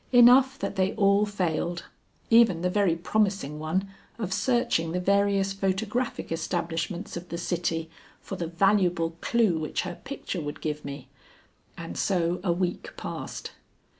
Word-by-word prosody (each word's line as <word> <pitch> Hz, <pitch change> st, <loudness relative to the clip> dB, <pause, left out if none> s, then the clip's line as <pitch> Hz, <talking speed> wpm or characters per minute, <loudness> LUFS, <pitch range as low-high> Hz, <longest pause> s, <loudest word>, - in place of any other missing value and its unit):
Enough 255 Hz, +2 st, +7 dB
that 200 Hz, -, -4 dB
they 190 Hz, +1 st, +2 dB
all 200 Hz, 0 st, +4 dB
failed, 175 Hz, -3 st, -1 dB, 0.5 s
even 225 Hz, -7 st, +5 dB
the 180 Hz, -, +1 dB
very 195 Hz, -4 st, +2 dB
promising 185 Hz, -4 st, 0 dB
one 175 Hz, +6 st, -1 dB, 0.3 s
of 200 Hz, -5 st, -3 dB
searching 240 Hz, -10 st, +1 dB
the 180 Hz, -, 0 dB
various 200 Hz, +1 st, +2 dB
photographic 200 Hz, +6 st, -2 dB
establishments 170 Hz, +3 st, -3 dB
of 175 Hz, +1 st, -7 dB
the 170 Hz, -, -4 dB
city, 170 Hz, -2 st, -1 dB, 0.3 s
for 195 Hz, -, -7 dB
the 170 Hz, -3 st, -3 dB
valuable 175 Hz, -2 st, +2 dB
clew 220 Hz, -9 st, +2 dB
which 155 Hz, -, -2 dB
her 180 Hz, -1 st, -6 dB
picture 265 Hz, -9 st, -5 dB
would 145 Hz, -1 st, -5 dB
give 150 Hz, -1 st, -3 dB
me. 140 Hz, -1 st, -7 dB, 0.7 s
And 85 Hz, -, -7 dB
so 175 Hz, -3 st, +1 dB
a 180 Hz, -, +2 dB
week 175 Hz, +1 st, -2 dB
passed. -, -, -6 dB
185 Hz, 145 wpm, -27 LUFS, 165-205 Hz, 0.7 s, Enough